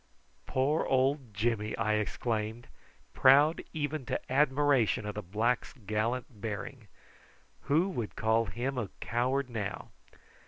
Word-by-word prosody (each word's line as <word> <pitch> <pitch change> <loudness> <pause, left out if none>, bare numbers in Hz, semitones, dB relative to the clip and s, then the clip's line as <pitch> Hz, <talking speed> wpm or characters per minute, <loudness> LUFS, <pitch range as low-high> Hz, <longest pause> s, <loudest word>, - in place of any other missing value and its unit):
"Poor 140 +5 +1
old 130 -1 +1
Jimmy!" 105 0 -1
I 110 - +1
exclaimed, 110 +2 -2 0.5
proud 145 +5 +5
even 150 -1 -2
to - - -3
admiration 135 -4 +3
of 105 - -3
the 105 - -4
black's 110 +6 -1
gallant 110 0 -3
bearing. 110 +2 -5 0.8
"Who 155 +6 +3
would 120 - -4
call 110 +1 +2
him 125 +7 -3
a 105 -5 -3
coward 130 +3 0
now!" 105 -5 -4
120 Hz, 120 wpm, -31 LUFS, 110-135 Hz, 0.8 s, proud